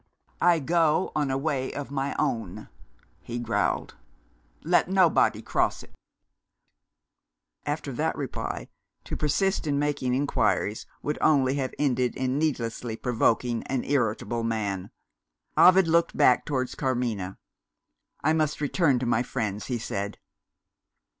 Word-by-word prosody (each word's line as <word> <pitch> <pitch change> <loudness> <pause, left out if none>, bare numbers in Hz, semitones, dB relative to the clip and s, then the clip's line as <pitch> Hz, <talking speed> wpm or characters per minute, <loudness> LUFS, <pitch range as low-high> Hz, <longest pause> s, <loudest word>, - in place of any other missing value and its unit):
"I 175 -1 +5
go 165 +2 +2
on 150 -2 +1
a 135 - 0
way 135 -2 -1
of 140 -1 -6
my 140 0 -2
own," 115 -11 -2 0.5
he 120 - -6
growled. 120 - -1 0.7
"Let - - +3
nobody 185 -3 +3
cross - - 0
it." - - -18 1.7
After - - -3
that - - -1
reply, - - -4 0.4
to - - -5
persist 165 +4 0
in 145 -1 +1
making 140 -3 0
inquiries 130 -5 0 0.2
would 150 - -2
only 135 -4 +4
have 130 -2 -3
ended 125 -4 +1
in 130 +2 -1
needlessly 120 -6 -2
provoking 120 -1 +1
an 130 -2 -1
irritable 120 -3 0
man. 100 -4 -2 0.7
Ovid 185 -1 +7
looked 170 +1 +2
back 130 -4 +4
towards 130 -3 -2
Carmina. 120 -8 -2 0.9
"I 155 +2 +3
must 155 -2 0
return 145 -1 +2
to 125 - -2
my 120 -1 +2
friends," 105 -4 -3
he 125 - -1
said. 100 -2 -4
130 Hz, 125 wpm, -26 LUFS, 120-150 Hz, 1.7 s, Ovid